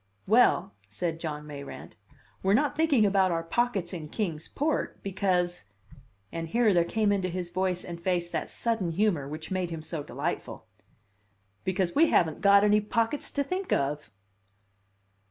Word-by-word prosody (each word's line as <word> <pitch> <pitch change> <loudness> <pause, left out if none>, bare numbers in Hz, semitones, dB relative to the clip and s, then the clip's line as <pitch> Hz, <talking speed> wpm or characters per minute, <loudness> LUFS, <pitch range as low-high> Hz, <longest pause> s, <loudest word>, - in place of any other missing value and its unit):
"Well," 220 - +4
said 165 - -3
John 150 -2 -4
Mayrant, 140 -2 -9 0.5
"we're 195 +2 +3
not 290 +3 +1
thinking 290 -8 +3
about 195 -2 +3
our 165 -1 -1
pockets 200 -2 -1
in 155 -4 -6
Kings 165 -7 -3
Port, 300 +1 -1
because" 180 - 0 0.7
(and 165 0 -4
here 220 +4 +3
there 175 -1 +4
came 210 +4 +1
into 190 -2 0
his 175 -1 -4
voice 185 0 -1
and 170 -1 -7
face 175 -1 0
that - - -2
sudden 220 -8 -1
humor 175 -7 +1
which 155 +4 -7
made 185 -2 -1
him 165 -2 -6
so 155 -1 -4
delightful) - - -4 1.0
"because 185 -1 0
we 325 +3 +5
haven't 160 -3 +2
got 200 0 +6
any 210 0 +4
pockets 230 +6 -1
to 280 - -1
think 365 +6 -4
of!" 145 0 0
185 Hz, 155 wpm, -28 LUFS, 165-215 Hz, 1.0 s, got